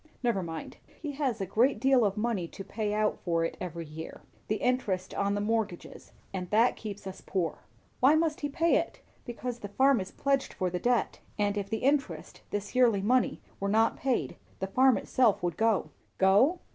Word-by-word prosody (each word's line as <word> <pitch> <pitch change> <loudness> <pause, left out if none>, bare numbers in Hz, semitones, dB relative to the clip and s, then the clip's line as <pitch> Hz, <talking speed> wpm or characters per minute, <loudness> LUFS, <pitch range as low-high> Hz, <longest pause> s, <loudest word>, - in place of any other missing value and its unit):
Never 235 -5 +1
mind. 165 -2 -6 0.2
He 300 -2 -4
has 270 -5 -1
a 195 - -1
great 235 +8 +2
deal 265 -2 +4
of 200 -1 0
money 210 -6 -1
to 195 - -9
pay 210 +2 -3
out 210 0 0
for 165 -2 +1
it - - -4
every 170 -2 -5
year 160 +1 -9 0.3
the 215 - +1
interest 210 -7 -1
on 200 0 0
the 205 - -1
mortgages 210 -4 -3 0.2
and 180 -2 -4
that 225 +3 +4
keeps 205 -2 -7
us 190 0 -7
poor." 175 -5 -2 0.4
"Why 275 +4 +6
must 315 -1 +1
he 290 - -1
pay 330 +4 +3
it?" - - -3 0.2
"Because 240 0 -5
the 205 - -6
farm 265 +3 +3
is 185 - -6
pledged 275 -1 0
for 185 -1 -2
the 180 - -2
debt; 245 +2 +1 0.2
and 205 -1 +1
if 200 -1 -3
the 220 0 -3
interest, 280 +1 0
this 205 0 -4
yearly 235 -6 +4
money, 250 +4 +2 0.2
were 200 - -1
not 225 +2 +3
paid, 260 -2 -1 0.2
the 190 - -1
farm 255 +6 +4
itself 235 -8 +2
would 175 -2 -1
go." 225 0 +1 0.3
"Go? 210 - +4
215 Hz, 195 wpm, -29 LUFS, 190-255 Hz, 0.4 s, Why